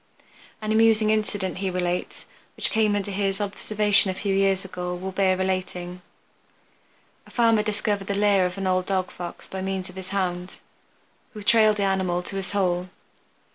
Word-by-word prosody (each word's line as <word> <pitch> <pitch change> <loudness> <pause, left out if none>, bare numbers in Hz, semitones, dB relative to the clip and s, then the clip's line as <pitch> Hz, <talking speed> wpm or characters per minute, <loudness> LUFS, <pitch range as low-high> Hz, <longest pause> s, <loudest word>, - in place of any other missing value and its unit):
An 215 - -1
amusing 220 -1 +4
incident, 205 -3 -1
he 195 -1 -1
relates, 180 -1 -2 0.3
which - - -1
came 215 -2 +2
under 205 0 -2
his 195 0 -1
observation 205 0 +1
a 185 - -2
few 200 0 -1
years 195 0 +2
ago 180 -1 -4
will 190 +2 -5
bear 190 -1 +2
relating. 180 -1 -3 1.3
A - - -15
farmer 230 -3 +3
discovered 205 -2 -1
the 200 - -1
lair 200 -2 +4
of 180 +2 -8
an 195 - -3
old 185 -1 +1
dog 190 -2 0
Fox 175 -1 -8
by 190 - -5
means 190 -1 -3
of - - -18
his 190 0 -7
hound, 180 -2 -2 0.8
who 210 - -7
trailed 215 0 +5
the 200 - 0
animal 190 -2 0
to 195 - -7
his 190 -2 -2
hole. 185 -2 0
195 Hz, 175 wpm, -25 LUFS, 185-205 Hz, 1.3 s, trailed